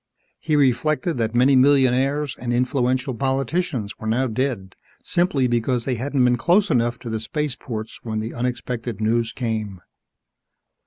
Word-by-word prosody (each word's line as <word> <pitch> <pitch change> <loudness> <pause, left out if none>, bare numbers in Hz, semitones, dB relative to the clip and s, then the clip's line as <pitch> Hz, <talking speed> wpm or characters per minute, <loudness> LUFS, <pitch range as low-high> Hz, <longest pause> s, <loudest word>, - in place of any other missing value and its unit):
He 155 -2 0
reflected 150 +4 +1
that 115 0 -1
many 130 +3 +5
millionaires 135 +1 +3
and 120 -1 -3
influential 125 +1 0
politicians 135 - -2
were 110 - -6
now 120 +4 +1
dead 115 -5 -2 0.3
simply 170 -7 +1
because 120 0 0
they 130 - 0
hadn't 130 +2 0
been 125 0 +3
close 185 - +3
enough 120 0 +1
to 120 - -6
the 110 - -2
spaceports 120 -3 -4
when 110 -2 -3
the 110 +2 -4
unexpected 120 -2 -3
news 115 +1 +1
came. 110 -6 -3
125 Hz, 145 wpm, -22 LUFS, 115-135 Hz, 0.3 s, many